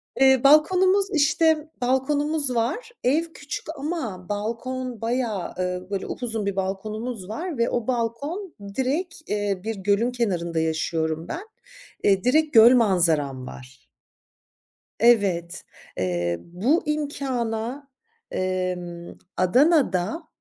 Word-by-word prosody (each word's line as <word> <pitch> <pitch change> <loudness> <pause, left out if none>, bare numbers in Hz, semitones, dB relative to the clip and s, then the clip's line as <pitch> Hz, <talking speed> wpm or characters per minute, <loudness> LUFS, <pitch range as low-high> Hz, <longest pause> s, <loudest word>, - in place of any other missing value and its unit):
Eee, 265 -1 +5
balkonumuz, 370 +7 +5
işte, 310 0 +2
balkonumuz 285 +2 +1
var. 310 - -1
Ev 285 +7 +3
küçük 285 +1 -6
ama 270 - -4
balkon 235 +3 -4
bayağı, 230 -5 -2
eee, 180 0 -2
böyle 195 -1 -2
upuzun 225 -4 -3
bir 200 -1 -1
balkonumuz 200 +2 -4
var 320 +7 -4
ve 235 0 +2
o 240 -2 -2
balkon 270 - -2 0.2
direkt 300 +7 -1
Eee, 205 -2 -1
bir 225 +1 -3
gölün 205 +5 +1
kenarında 175 -9 -1
yaşıyorum 160 0 -1
ben. 365 +6 -6 0.6
Eee, 195 -2 +3
direkt 305 +5 +2
göl 230 +3 +8
manzaram 160 - +2
var. 130 0 -13 1.1
Evet, 200 -7 +2 0.3
eee, 85 -2 -1
bu 215 - 0
imkâna, 270 -4 -3 0.4
emm, 180 -2 -3 0.2
Adana'da 250 - +2
230 Hz, 110 wpm, -24 LUFS, 185-285 Hz, 1.1 s, göl